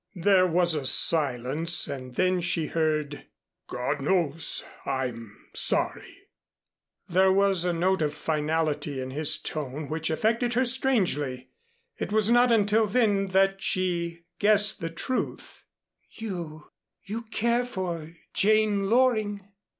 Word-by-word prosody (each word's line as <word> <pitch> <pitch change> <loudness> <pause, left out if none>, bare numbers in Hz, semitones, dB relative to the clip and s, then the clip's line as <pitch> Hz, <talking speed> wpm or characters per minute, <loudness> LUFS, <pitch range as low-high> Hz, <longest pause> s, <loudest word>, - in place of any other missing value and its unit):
There 185 +1 +3
was 175 0 +2
a 150 -3 -2
silence 150 +3 +1
and 130 -3 -7
then 185 +2 +1
she 170 -2 0
heard, 155 -2 -2 0.4
"God 125 +2 -3
knows, 165 -1 0 0.2
I'm 120 -5 -4 0.2
sorry." - - -1 0.8
There 190 +2 +3
was 195 -2 +2
a 180 - +1
note 180 +2 0
of 150 -1 -1
finality 155 -2 -1
in 130 0 -5
his 150 +3 +2
tone 150 0 -5
which 160 0 -2
affected 230 +8 0
her 255 +1 +2
strangely. 185 - 0 0.5
It - - -4
was 215 +1 +3
not 240 0 +5
until 215 0 +3
then 205 -3 +1
that 195 +1 +2
she 170 -2 -1 0.2
guessed 210 0 +3
the 165 - -3
truth. 210 +10 -4 0.4
"You 170 -8 -7 0.3
you 215 +4 -5
care 235 +2 0
for 175 -9 -5 0.2
Jane 210 -1 +2
Loring?" 215 -5 +1
180 Hz, 125 wpm, -26 LUFS, 155-210 Hz, 0.8 s, not